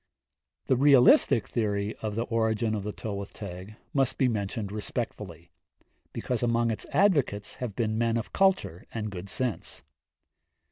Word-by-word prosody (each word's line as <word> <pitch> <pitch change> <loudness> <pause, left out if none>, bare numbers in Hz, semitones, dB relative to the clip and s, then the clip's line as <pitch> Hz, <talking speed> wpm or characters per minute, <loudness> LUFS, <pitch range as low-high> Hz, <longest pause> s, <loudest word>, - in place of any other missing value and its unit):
The 130 - +3
realistic 130 -4 +5
theory 105 -2 -1
of 105 -2 -4
the 115 - 0
origin 110 -1 0
of 105 - -1
the 105 +2 -4
Tylwyth 100 -2 -6
Teg 100 +1 -8 0.2
must 135 -3 +1
be 130 - +3
mentioned 105 -2 -2
respectfully, 105 -6 -5 0.6
because 125 -2 -3
among 115 -1 +2
its 110 - -4
advocates 145 - +2
have 120 -6 -5
been 110 -1 -1
men 115 0 +1
of 115 - -5
culture 190 - +1
and 110 -2 -4
good 95 +1 -7
sense. 110 - -3
110 Hz, 145 wpm, -28 LUFS, 100-120 Hz, 0.6 s, realistic